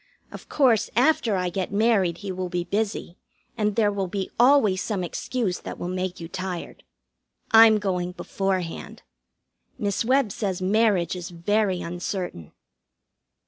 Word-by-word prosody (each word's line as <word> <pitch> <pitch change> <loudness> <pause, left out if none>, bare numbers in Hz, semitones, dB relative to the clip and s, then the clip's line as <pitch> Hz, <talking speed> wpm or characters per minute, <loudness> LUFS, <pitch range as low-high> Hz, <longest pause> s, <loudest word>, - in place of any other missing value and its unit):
Of - - -11
course, 250 -7 +3
after 245 -4 +3
I 180 -1 0
get 185 +1 -3
married 200 -5 +2
he 195 - -3
will 185 -1 -4
be 175 -1 -2
busy, 200 -2 -3 0.4
and 210 -3 0
there 210 -3 +3
will 195 -2 -2
be 190 +1 -4
always 240 -7 +5
some 200 -5 -2
excuse 195 +2 -2
that - - -7
will - - -5
make 185 0 -3
you 165 - -7
tired. 185 -1 -6 0.7
I'm 225 -1 +8
going 180 -3 -2
beforehand. 185 -3 -3 0.7
Miss 205 -4 -1
Webb 255 -2 +2
says 195 -3 -3
marriage 190 -2 +2
is 180 0 -6
very 185 +2 0
uncertain. 175 - -5
195 Hz, 140 wpm, -24 LUFS, 180-220 Hz, 0.7 s, I'm